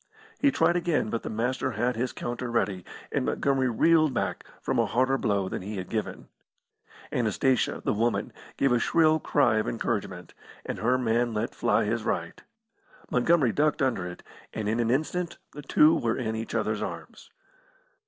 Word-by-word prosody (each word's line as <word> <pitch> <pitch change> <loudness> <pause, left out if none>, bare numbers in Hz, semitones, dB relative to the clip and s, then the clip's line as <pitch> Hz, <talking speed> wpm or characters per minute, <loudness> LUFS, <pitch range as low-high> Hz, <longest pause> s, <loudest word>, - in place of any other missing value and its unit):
He 285 - +4
tried 260 -10 +2
again, 170 -10 0
but 115 - -2
the - - -5
Master 125 +3 -1
had 120 +3 0
his 125 +2 -1
counter 120 0 -4
ready, 100 -6 -1 0.3
and - - 0
Montgomery 130 - +1
reeled 155 +3 +3
back - - -2 0.2
from - - -1
a - - +2
harder 130 +3 +2
blow 100 -7 0
than - - -4
he 100 +2 -6
had 95 -1 -6
given. 110 -2 -4 0.8
Anastasia, 125 +1 +1
the - - +2
woman, 115 +3 0 0.2
gave 135 -1 +2
a 120 - +3
shrill 160 +3 +3
cry 110 -6 +2
of 110 - 0
encouragement, 100 -6 -3 0.3
and - - -4
her 120 +5 +2
man 120 -1 0
let 110 +2 -2
fly 120 - +1
his 115 +2 -1
right. 85 -4 -3 0.7
Montgomery 130 0 +3
ducked 150 +3 +1
under 115 -9 0
it, 90 - -9 0.3
and 110 -1 -2
in 110 +2 0
an 115 -1 +1
instant 160 +7 -1 0.2
the 150 - -8
two 150 +3 +5
were 115 -1 0
in 110 -3 -2
each 115 +1 -5
other's 110 -1 -1
arms. - - -7
120 Hz, 175 wpm, -27 LUFS, 110-135 Hz, 0.8 s, two